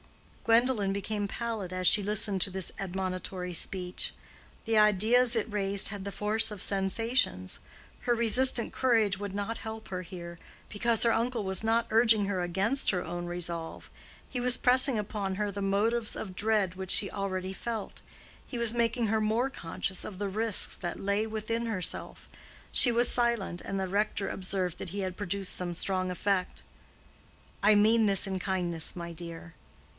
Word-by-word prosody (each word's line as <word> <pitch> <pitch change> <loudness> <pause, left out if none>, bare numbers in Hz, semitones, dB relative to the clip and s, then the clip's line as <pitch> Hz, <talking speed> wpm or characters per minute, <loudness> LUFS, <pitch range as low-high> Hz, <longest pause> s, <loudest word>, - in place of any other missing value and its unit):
Gwendolen 230 -3 +2
became 205 +1 -3
pallid 225 -6 -4
as 185 -1 0
she 205 - +6
listened 205 -1 +1
to 195 - +2
this 190 -1 -3
admonitory 185 -1 -4
speech. 180 +1 0 0.5
The 225 -1 +1
ideas 220 +4 +4
it 225 0 -1
raised 200 -1 +2
had 200 -2 -6
the 200 - -5
force 215 +2 +3
of 205 -3 -7
sensations. 195 - -1 0.4
Her 240 - +1
resistant 235 +1 +4
courage 225 -6 +2
would 200 -1 -6
not 205 +3 -4
help 220 0 -8
her 185 -1 -4
here, 170 -1 -9 0.3
because 225 +2 +1
her 230 -1 +3
uncle 235 -1 -1
was 190 +2 +2
not 225 +1 +1
urging 225 -2 +4
her 195 -2 -2
against 195 +10 +1
her 180 -2 0
own 175 +1 -5
resolve; 170 -1 -2 0.4
he 250 - -4
was 250 0 +4
pressing 255 0 +5
upon 200 -2 -3
her 205 +1 -2
the 200 +1 -6
motives 215 +4 0
of 190 -4 -7
dread 205 -3 +1
which 190 0 -4
she 200 - +4
already 190 -1 -4
felt; 225 0 -6 0.4
he 250 - -7
was 235 -1 0
making 235 0 0
her 220 +1 0
more 225 +5 0
conscious 185 -3 -4
of 195 - -8
the 205 +1 -3
risks 215 +1 +1
that 175 - -5
lay 200 +2 0
within 220 +2 -3
herself. 190 -6 -2 0.5
She 245 - +4
was 240 +1 +5
silent, 235 -8 +3
and 195 - -4
the 190 - -2
rector 200 +1 -1
observed 185 -2 -2
that - - -6
he 200 +3 -4
had 185 -1 -4
produced 200 -1 -3
some 175 -1 -3
strong 185 +1 -1
effect. 185 +1 -2 1.0
"I 210 +1 +5
mean 220 +2 +4
this 195 0 +3
in 190 -1 -3
kindness, 175 -4 -2
my 170 -1 -7
dear." 165 0 -9
200 Hz, 170 wpm, -29 LUFS, 185-225 Hz, 1.0 s, she